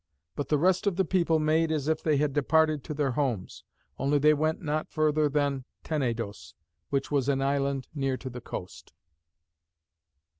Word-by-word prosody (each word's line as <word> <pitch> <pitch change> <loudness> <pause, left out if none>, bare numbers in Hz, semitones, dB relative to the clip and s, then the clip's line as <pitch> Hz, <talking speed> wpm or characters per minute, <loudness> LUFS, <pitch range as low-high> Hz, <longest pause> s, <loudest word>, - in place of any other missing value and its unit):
But 145 - -4
the 150 - +3
rest 185 +5 +2
of 195 - +2
the 190 +1 +1
people 170 -2 +2
made 160 +1 +2
as 150 -2 -1
if 160 0 +1
they 155 -3 +2
had 145 -1 +1
departed 155 +1 +2
to 150 - -5
their 140 -2 0
homes; 120 -8 -2 0.4
only 140 +2 +2
they 150 +2 +5
went 155 +1 0
not 155 -1 -2
further 155 -1 +2
than 140 -2 0 0.2
Tenedos, 115 -9 -3 0.3
which 140 0 -1
was 140 -2 +1
an 135 -1 +1
island 140 -1 0
near 135 -3 -1
to 130 - -7
the 125 0 -8
coast. 95 -5 -8
145 Hz, 175 wpm, -28 LUFS, 135-155 Hz, 0.4 s, they